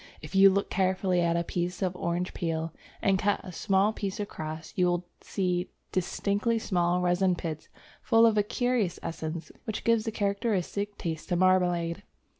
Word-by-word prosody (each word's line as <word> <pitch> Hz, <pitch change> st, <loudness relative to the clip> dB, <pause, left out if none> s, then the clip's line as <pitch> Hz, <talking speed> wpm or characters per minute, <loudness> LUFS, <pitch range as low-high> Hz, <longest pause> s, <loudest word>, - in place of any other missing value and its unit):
If 155 Hz, +3 st, -10 dB
you 195 Hz, 0 st, +8 dB
look 200 Hz, +1 st, 0 dB
carefully 185 Hz, -1 st, +1 dB
at 170 Hz, 0 st, +2 dB
a 170 Hz, -, +1 dB
piece 175 Hz, +2 st, -2 dB
of 185 Hz, -1 st, 0 dB
orange 175 Hz, +1 st, -2 dB
peel, 165 Hz, -2 st, -2 dB, 0.3 s
and 195 Hz, -1 st, +3 dB
cut 205 Hz, +1 st, +2 dB
a 185 Hz, -, -8 dB
small 195 Hz, +3 st, +2 dB
piece 200 Hz, -1 st, -4 dB
across, 160 Hz, -5 st, -5 dB
you 180 Hz, -3 st, +3 dB
will 175 Hz, 0 st, 0 dB, 0.2 s
see 180 Hz, -2 st, -1 dB, 0.2 s
distinctly 200 Hz, +5 st, 0 dB
small 180 Hz, -4 st, +1 dB
resin 180 Hz, +1 st, +2 dB
pits 160 Hz, -3 st, -5 dB, 0.3 s
full 225 Hz, 0 st, +5 dB
of 225 Hz, -2 st, +4 dB
a 210 Hz, -, +4 dB
curious 230 Hz, -3 st, 0 dB
essence 160 Hz, 0 st, -5 dB
which 220 Hz, -3 st, -4 dB
gives 230 Hz, -1 st, +3 dB
the 225 Hz, -, -1 dB
characteristic 200 Hz, -1 st, -1 dB
taste 160 Hz, -1 st, -4 dB
to 175 Hz, -, +2 dB
marmalade. 175 Hz, -1 st, +2 dB
185 Hz, 170 wpm, -28 LUFS, 175-200 Hz, 0.3 s, you